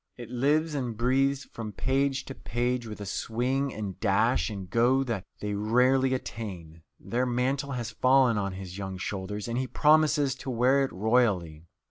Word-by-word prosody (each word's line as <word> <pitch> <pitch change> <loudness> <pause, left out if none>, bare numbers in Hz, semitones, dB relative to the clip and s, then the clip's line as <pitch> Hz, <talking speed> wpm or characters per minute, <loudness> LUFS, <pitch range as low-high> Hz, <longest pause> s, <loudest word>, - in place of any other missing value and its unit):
It 120 -1 -9
lives 150 +6 +1
and 125 -6 -3
breathes 135 +3 +2
from 110 -2 -7
page 135 +2 0
to 135 - -7
page 120 0 -2
with 105 -1 -8
a 100 - -6
swing 125 +7 -1
and 105 -5 -6
dash 75 +5 +2
and 100 -3 -6
go 120 +7 +3
that 115 -7 -3 0.2
they 105 0 -2
rarely 125 +5 +3
attain. 90 -9 -7 0.2
Their 125 +2 -1
mantle 135 +3 -1
has 120 -3 -4
fallen 130 -2 +4
on 100 -2 -2
his 95 0 -8
young 95 -1 -5
shoulders, 100 +2 -4
and 120 +1 -1
he 130 - -2
promises 150 +1 +3
to 130 - -7
wear 130 +3 +3
it 135 - -2
royally. 95 -7 +1
120 Hz, 170 wpm, -28 LUFS, 105-135 Hz, 0.2 s, fallen